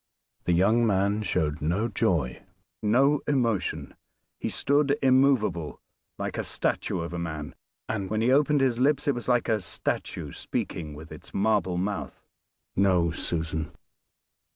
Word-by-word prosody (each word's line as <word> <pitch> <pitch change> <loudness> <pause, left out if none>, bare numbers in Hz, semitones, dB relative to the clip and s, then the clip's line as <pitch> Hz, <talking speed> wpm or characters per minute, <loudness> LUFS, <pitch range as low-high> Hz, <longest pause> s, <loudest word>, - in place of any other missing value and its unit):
The 90 - +2
young 110 +7 +4
man 100 +1 +1
showed 80 -7 -1
no 90 +9 0
joy, 85 - 0 0.4
no 135 +7 +3
emotion. 115 -9 0 0.5
He - - -2
stood 145 0 +2
immovable, 130 - +3 0.4
like - - -3
a - - 0
statue 90 - -1
of 85 +1 -5
a 85 - -3
man, 80 -4 -5 0.3
and 100 -4 -3
when 110 0 0
he 120 +3 +3
opened 145 +1 +4
his 125 -3 +2
lips 145 +2 +2
it 145 - +4
was 120 -1 -6
like 120 -1 +2
a 110 -2 +1
statue 90 - -3
speaking 75 -3 -4
with 80 +2 -11
its - - -11
marble 95 -3 +1
mouth. 100 +2 -4 0.5
"No! 90 -4 +3
Susan. 80 -2 -3
105 Hz, 145 wpm, -27 LUFS, 85-125 Hz, 0.5 s, young